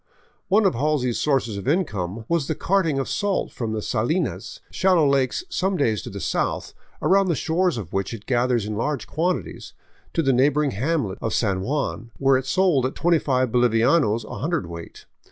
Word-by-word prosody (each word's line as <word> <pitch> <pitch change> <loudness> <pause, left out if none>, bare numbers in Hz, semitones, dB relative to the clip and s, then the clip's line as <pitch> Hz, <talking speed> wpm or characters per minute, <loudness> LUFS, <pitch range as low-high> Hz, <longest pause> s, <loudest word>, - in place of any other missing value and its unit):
One 205 +2 +3
of 190 - +3
Halsey's 130 -2 0
sources 135 -8 0
of 100 - -6
income 110 - -1
was 170 -5 0
the 160 - -1
carting 170 -5 +1
of 135 - -1
salt 205 -1 -1
from 115 -3 -4
the 110 -1 -3
salinas, 155 +11 -2
shal 190 0 +2
low 160 -4 +4
lakes 140 - +1
some 190 - -1
days 110 - +1
to - - -8
the - - -7
south, - - -2 0.3
around 195 +1 +4
the 170 - +1
shores 170 +1 0
of 95 -7 -7
which 95 0 -1
it 115 -3 -8
gathers 120 -3 +1
in 105 0 -4
large 140 +5 -2
quantities, 155 - -3 0.4
to 165 - +1
the 135 -2 +3
neighboring 140 +3 +2
hamlet 125 -3 -1
of - - -1
San 100 -5 0
Juan, 120 -1 -2
where 135 0 +3
it 130 0 -1
sold 165 -7 +2
at 130 - -8
25 140 -7 +2
boHvianos 120 0 +3
a - - -7
hundred 165 - -1
weight. 85 0 -10
135 Hz, 190 wpm, -23 LUFS, 115-165 Hz, 0.4 s, low